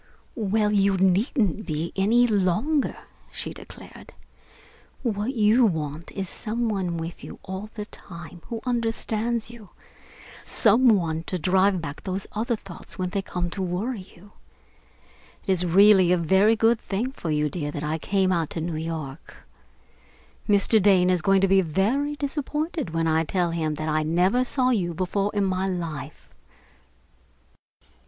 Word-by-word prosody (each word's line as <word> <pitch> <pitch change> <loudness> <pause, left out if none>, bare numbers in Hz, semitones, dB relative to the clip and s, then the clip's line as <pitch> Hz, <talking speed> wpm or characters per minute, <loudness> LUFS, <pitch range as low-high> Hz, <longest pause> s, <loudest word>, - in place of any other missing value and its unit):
"Well, 215 -2 0
you 200 -1 +3
needn't 205 - +1
be 155 +1 -3
any 225 +5 +4
longer," 220 - +1 0.3
she - - -5
declared. - - -13 0.9
"What 225 +2 -2
you 220 +3 +4
want 160 -5 -1
is 195 -1 -4
some 230 +5 -3
one 185 -5 -2
with 165 +1 -6
you - - -9
all 190 +3 -6
the 210 -2 -5
time 170 -4 -11
who 230 -1 -5
understands 230 -1 -1
you, 225 -5 -13 0.7
some 235 +4 +3
one 165 -7 +1
to 185 - -2
drive 185 +1 +2
back 145 -1 -6
those 190 0 -4
other 230 +3 -1
thoughts 195 -5 -10
when 185 -1 -2
they 200 0 -1
come 175 -2 -4
to 195 - -4
worry 190 +3 -3
you. 200 +4 -17 1.1
It - - 0
is 180 -1 +2
really 190 0 +6
a 180 - +4
very 190 +6 +4
good 225 +1 +3
thing 225 +7 -3
for 175 -11 -6
you, 150 0 +1
dear, 150 -1 -4
that 145 0 -5
I 155 +2 -2
came 190 +2 +1
out 165 -4 0
to - - 0
New 160 0 -3
York. 160 -2 -7 1.0
Mr. 205 +2 +4
Dane 185 -2 +4
is 180 -2 +1
going 195 +3 +3
to 195 - +4
be 195 0 +4
very 220 - 0
disappointed 295 - -3
when 165 0 -1
I 160 0 +2
tell 175 +1 0
him 160 -2 -1
that 155 +1 -4
I 155 0 +1
never 180 +10 +2
saw 255 0 +1
you 175 -8 0
before 195 +3 -1
in 205 - +2
my 190 0 0
life.... 160 -5 -5
190 Hz, 160 wpm, -25 LUFS, 170-220 Hz, 1.1 s, really